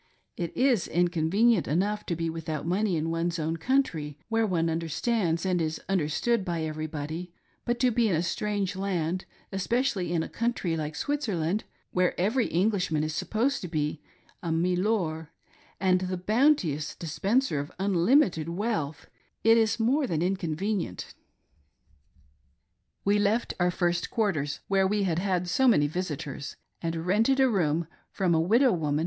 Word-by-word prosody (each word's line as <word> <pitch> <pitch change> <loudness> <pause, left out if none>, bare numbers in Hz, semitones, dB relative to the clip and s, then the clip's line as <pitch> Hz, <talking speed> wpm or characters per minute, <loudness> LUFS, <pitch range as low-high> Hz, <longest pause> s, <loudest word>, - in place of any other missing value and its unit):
It 170 -2 -5
is 250 -8 +3
inconvenient 175 +5 +2
enough 205 +7 0
to 170 - -1
be 165 0 -2
without 160 -2 -4
money 185 +1 +1
in 160 +1 -1
one's 170 +1 -1
own 160 +1 -2
country, 165 - 0
where 225 -1 +2
one 170 -4 +1
understands 165 +2 0
and 180 -2 +1
is 160 0 -2
understood 195 +5 +1
by 170 -3 -2
every 155 0 -3
body; 160 +3 -5 0.3
but 240 0 0
to 250 -1 +4
be 230 -1 +2
in 180 - +2
a 160 - 0
strange 200 +1 -1
land, 185 -2 -2 0.3
especially 195 -1 0
in 165 -2 +1
a - - -5
country 230 -8 -1
like 155 -1 -4
Switzerland, 210 - -1 0.3
where 180 -1 +1
every 225 +7 +2
Englishman 180 -4 +1
is 155 0 -2
supposed 235 - 0
to 180 - -4
be 150 -2 -2 0.4
a 170 -4 -3
"milor" 175 -2 0 0.5
and 185 0 +3
the 185 0 -2
bounteous 190 - +2
dispenser 195 - 0
of 145 +1 -5
Unlimited 190 - +3
wealth, 170 -6 -2 0.4
it 225 +1 +6
is 225 0 +2
more 265 +5 +2
than 165 -4 0
inconvenient. 185 - -2 1.9
We 205 +1 +3
left 215 +3 +1
our 180 0 +3
first 175 -1 0
quarters, 170 - -1
where 195 -1 +3
we 205 +1 +1
had 170 -3 0
had 180 -2 0
so 260 +9 +2
many 150 -12 +5
visitors, 150 -3 -4 0.3
and 165 0 -3
rented 225 +9 +3
a 265 - +6
room 170 -7 +1 0.2
from 185 -4 0
a 160 - +3
widow 235 +9 +4
woman. 150 -5 0
180 Hz, 155 wpm, -28 LUFS, 160-215 Hz, 1.9 s, it